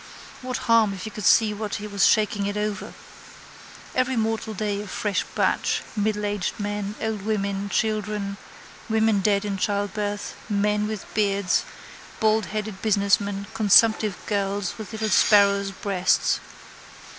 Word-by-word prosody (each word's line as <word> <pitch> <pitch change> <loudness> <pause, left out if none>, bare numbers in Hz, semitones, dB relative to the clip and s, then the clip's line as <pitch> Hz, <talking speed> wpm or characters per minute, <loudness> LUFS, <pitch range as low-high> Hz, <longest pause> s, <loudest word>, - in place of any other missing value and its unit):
What 255 -1 -3
harm 225 -3 +4
if 180 - -8
he 215 - -6
could 210 -2 -6
see 220 -2 +5
what 210 0 -4
he 205 - -5
was 200 -1 +2
shaking 205 -2 +2
it 205 +1 -3
over. 210 -1 -3 1.0
Every 255 0 +1
mortal 220 -1 -1
day 205 0 -2
a 210 - -8
fresh 205 +1 -1
batch: - - +1
middleaged 205 -2 -1
men, 205 0 -3
old 220 -2 -2
women, 200 -1 -2
children, 210 -2 -1 0.5
women 220 -1 +2
dead 200 +1 +1
in 200 -1 -2
childbirth, 205 +1 -2 0.2
men 210 0 +1
with 215 -2 -5
beards, 200 -3 +1 0.5
baldheaded 215 -2 0
businessmen, 200 -1 +1
consumptive 215 -1 +4
girls 200 -2 -1
with 215 -4 -7
little 220 0 -2
sparrows' 200 -2 +4
breasts. 195 -1 +1
205 Hz, 135 wpm, -24 LUFS, 200-215 Hz, 1.0 s, see